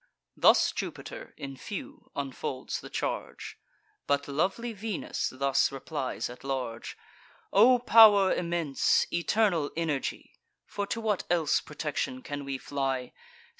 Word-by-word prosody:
Thus - - +5
Jupiter - - -7
in 135 -1 -7
few 265 - -8
unfolds 135 -1 -4
the - - -10
charge; - - -4 0.5
But 140 0 +1
lovely 190 +11 -1
Venus 215 -1 -3
thus 135 +1 +1
replies 135 0 -4
at 125 - -11
large: 130 -4 -4 0.6
"O 245 +5 +7
pow'r 215 -5 +7
immense, 170 -5 +1
eternal 170 -3 +2
energy, 155 -5 -3 0.3
(For 200 0 -4
to 230 - -2
what 215 -4 -1
else 165 -4 +2
protection 160 - -4
can 145 0 -5
we 135 -1 -3
fly?) 135 -2 -3
155 Hz, 120 wpm, -29 LUFS, 135-205 Hz, 0.6 s, O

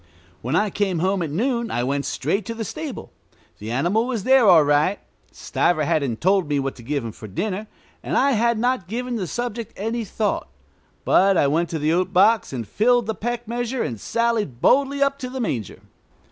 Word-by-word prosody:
When 130 +7 -2
I 210 +3 +2
came 195 -3 0
home 185 +3 0
at 165 - -2
noon 235 - -1
I 120 - -1
went 140 +2 -1
straight 195 +10 -1
to 230 - -4
the 225 -1 -4
stable. 310 -1 -6 0.5
The 105 - -7
animal 175 - +1
was 235 -6 -2
there 260 -2 +5
all 170 -5 +7
right. 145 +7 +2 0.3
Stiver 165 -3 0
hadn't 140 -8 -1
told 190 -1 +2
me 145 -1 +1
what 135 0 -3
to - - -11
give 140 +1 -3
him 115 - -4
for 110 - -11
dinner, 200 - -3 0.3
and - - -2
I 280 - +3
had 235 -1 +2
not 245 -4 0
given 245 +3 -3
the 190 -4 -3
subject 240 0 -4
any 225 +3 -2
thought; 210 - -2 0.6
but 195 0 +4
I - - +4
went 160 +5 +1
to 165 - -3
the 155 +1 +1
oat 185 +1 0
box 215 +5 +4
and 120 -5 -5
filled 240 - +2
the 220 - -2
peck 240 +3 -4
measure 240 +1 -2
and 115 -4 -5
sallied 230 - -1
boldly 280 - +3
up 275 0 0
to 255 -2 -5
the 260 +1 -6
manger. 120 - -3
200 Hz, 205 wpm, -22 LUFS, 155-235 Hz, 0.6 s, all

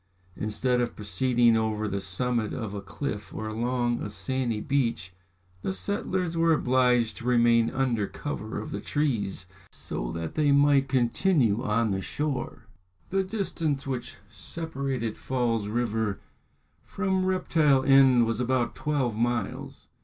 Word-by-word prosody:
Instead 125 +4 0
of 120 - -2
proceeding 115 +3 +2
over 110 -1 0
the 100 -1 -2
summit 110 +4 -1
of 110 -4 -4
a 100 - -4
cliff 105 +1 -5
or 110 - -5
along 120 +2 -1
a - - -4
sandy 120 0 -2
beach, 115 -8 -1 0.5
the 95 - -2
settlers 185 - -2
were 165 0 +4
obliged 125 -4 +2
to - - -9
remain 120 -1 +4
under 120 -6 0
cover 110 -8 -5
of 110 - -7
the 100 - -4
trees 115 -11 -1 0.3
so - - -5
that 80 -1 -4
they 150 -2 +2
might 140 -1 +4
continue 125 - +2
on 115 -2 +1
the 95 0 -1
shore. 135 -2 -3 0.5
The 195 0 +2
distance 170 -8 -2
which 125 -3 -4
separated 135 -2 -4
Falls 120 -5 -1
River 110 -2 -1 0.6
from 190 -2 -1
Reptile 160 -7 +2
End 135 -3 +6
was 115 0 -1
about 125 -1 0
twelve 135 -7 -1
miles. 115 -2 -2
120 Hz, 140 wpm, -27 LUFS, 110-140 Hz, 0.6 s, End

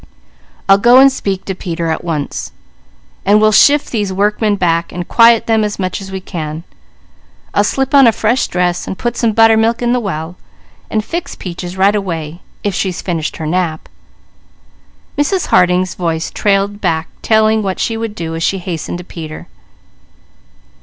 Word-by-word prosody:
"I'll 195 0 +6
go 240 +4 +6
and 270 +1 +7
speak 195 -7 -3
to 190 - -3
Peter 170 -2 -3
at 160 - -3
once, 155 -4 -4 0.7
then 205 +2 +4
we'll 215 0 +4
shift 285 +7 +4
these 210 -4 -1
workmen 205 +2 +1
back, 170 -3 0
and 175 0 -6
quiet 230 -1 +5
them 220 -1 +2
as 210 -1 -3
much 185 0 -3
as 195 0 -9
we 190 - -4
can. 160 -4 -6 0.9
I'll 205 - +3
slip 270 +6 -1
on 275 -3 +7
a - - +6
fresh 225 +4 0
dress, 180 0 -1
and 190 - -5
put 240 0 -2
some 230 -2 +1
buttermilk 225 +1 +4
in 240 0 +1
the 250 - +1
well, 175 -5 -5 0.5
and 215 -1 -1
fix 345 +1 -4
Peaches 180 0 -7
right 195 +2 +4
away, 170 -4 -4 0.2
if 205 - -1
she's 185 -1 -2
finished 165 -4 -3
her 160 - -5
nap 165 -1 -2 0.7
" - - -34
Mrs. 360 +5 +1
Harding's 180 0 +3
voice 165 -2 -2
trailed 200 0 0
back 160 0 -1
telling 220 0 +3
what 190 -2 -3
she 225 - -1
would 225 -2 -4
do 165 -3 -5
as 165 - -4
she 195 - 0
hastened 175 -2 -5
to 180 - -8
Peter. 160 -3 -8
195 Hz, 175 wpm, -15 LUFS, 175-220 Hz, 0.9 s, and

